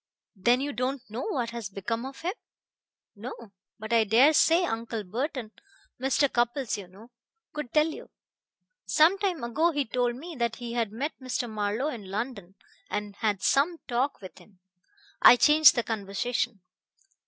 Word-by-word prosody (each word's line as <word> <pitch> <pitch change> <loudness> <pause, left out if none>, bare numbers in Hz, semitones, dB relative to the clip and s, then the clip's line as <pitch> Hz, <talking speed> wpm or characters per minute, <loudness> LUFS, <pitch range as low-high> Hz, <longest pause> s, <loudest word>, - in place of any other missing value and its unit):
"Then 240 +7 +2
you 285 +1 -3
don't 255 +2 -2
know 230 +4 -4
what 245 - -2
has 235 -4 -6
become 230 +5 -4
of 270 - -11
him?" 355 +3 -2 0.8
"No: 230 0 -9 0.3
but 220 +1 -5
I 230 -1 +5
dare 240 +9 +5
say 335 +3 +4
Uncle 225 -4 -3
Burton 235 - -4 0.5
Mr. 270 +2 +2
Cupples, 240 0 0
you 200 -3 -8
know 205 +7 -16 0.4
could 300 -5 -5
tell 305 0 +4
you. 320 - -7 0.8
Some 335 +6 +4
time 375 -8 -1
ago 295 +9 +1
he 290 -4 -1
told 245 +1 0
me 325 +6 -9
that 235 -1 -1
he 235 -1 -7
had 230 -4 -1
met 275 +8 -3
Mr. 255 -1 -2
Marlowe 215 +5 -2
in 215 -10 -8
London, 200 -3 -5 0.3
and 205 -1 -4
had 205 -3 -1
some 315 +5 +2
talk 255 +2 -1
with 185 - -11
him. 195 -4 -21 0.6
I - - +10
changed 300 +4 +6
the 240 - 0
conversation." 220 +1 -2
240 Hz, 165 wpm, -27 LUFS, 215-280 Hz, 0.8 s, I